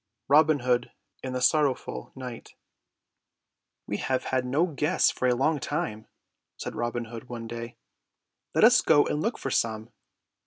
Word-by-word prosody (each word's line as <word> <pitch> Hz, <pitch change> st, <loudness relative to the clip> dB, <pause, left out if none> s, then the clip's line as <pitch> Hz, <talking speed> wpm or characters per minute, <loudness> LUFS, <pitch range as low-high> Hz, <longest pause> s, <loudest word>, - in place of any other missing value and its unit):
ROBIN 150 Hz, 0 st, +5 dB
HOOD 125 Hz, -1 st, 0 dB, 0.3 s
AND 130 Hz, -1 st, -5 dB
THE 125 Hz, -, -2 dB
SORROWFUL 145 Hz, -3 st, +1 dB
KNIGHT 125 Hz, -3 st, -9 dB, 1.3 s
"We 105 Hz, -, -3 dB
have 130 Hz, +3 st, -1 dB
had 130 Hz, -1 st, -1 dB
no 145 Hz, +7 st, +2 dB
guests 155 Hz, +1 st, +1 dB
for 130 Hz, -, -1 dB
a 125 Hz, -, +3 dB
long 150 Hz, +4 st, +1 dB
time," 110 Hz, -4 st, -3 dB, 0.5 s
said -, -, -5 dB
Robin 120 Hz, 0 st, -3 dB
Hood 115 Hz, +2 st, -10 dB
one 120 Hz, -2 st, -6 dB
day. 115 Hz, +1 st, -7 dB, 0.8 s
"Let -, -, +4 dB
us -, -, +7 dB
go 145 Hz, -, +5 dB
out -, -, 0 dB
and 150 Hz, -, -1 dB
look 230 Hz, +6 st, -1 dB
for 135 Hz, -, -4 dB
some. 110 Hz, -1 st, -1 dB
125 Hz, 160 wpm, -27 LUFS, 120-145 Hz, 1.3 s, us